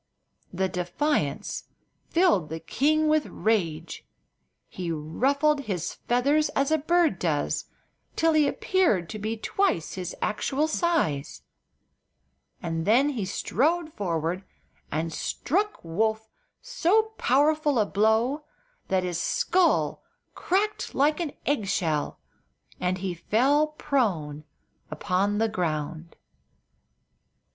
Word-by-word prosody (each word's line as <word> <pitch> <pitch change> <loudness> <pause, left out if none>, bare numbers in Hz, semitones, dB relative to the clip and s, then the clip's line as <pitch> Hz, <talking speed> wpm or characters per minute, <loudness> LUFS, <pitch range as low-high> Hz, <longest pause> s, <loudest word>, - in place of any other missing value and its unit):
The 190 +1 0
defiance 185 - -1 0.4
filled 330 - +3
the 160 +1 -4
king 310 - +1
with 305 -1 +2
rage. 170 -7 -1 0.6
He 175 -2 -5
ruffled 275 - +1
his 180 -4 -2
feathers 280 +6 +1
as 275 +2 +1
a 315 - +3
bird 325 - +2
does, 155 -4 -1 0.5
till 325 0 +3
he 305 -2 +4
appeared 335 - +1
to 215 - -6
be 220 +2 -3
twice 220 - 0
his 180 -2 -5
actual 275 +8 0
size, 310 - 0 1.2
and 165 -1 -2
then 255 +7 +5
he 235 -9 -2
strode 310 - 0
forward 175 -1 -2 0.5
and 160 +1 -2
struck 405 - -1
Woof 220 +6 -1 0.4
so 440 -2 +2
powerful 295 +1 +3
a 215 - +3
blow 220 +9 +1 0.4
that 190 -1 +1
his 175 -2 -2
skull 360 -2 +2 0.3
crackled 415 +4 -1
like 300 +4 +3
an 325 -5 -3
egg 265 -8 0
shell 160 -7 -1 0.6
and 180 +1 0
he 185 -1 -3
fell 265 - +2
prone 195 - -1 0.4
upon 195 +5 0
the 225 +1 +2
ground. 165 -4 -3
220 Hz, 110 wpm, -26 LUFS, -, 1.2 s, then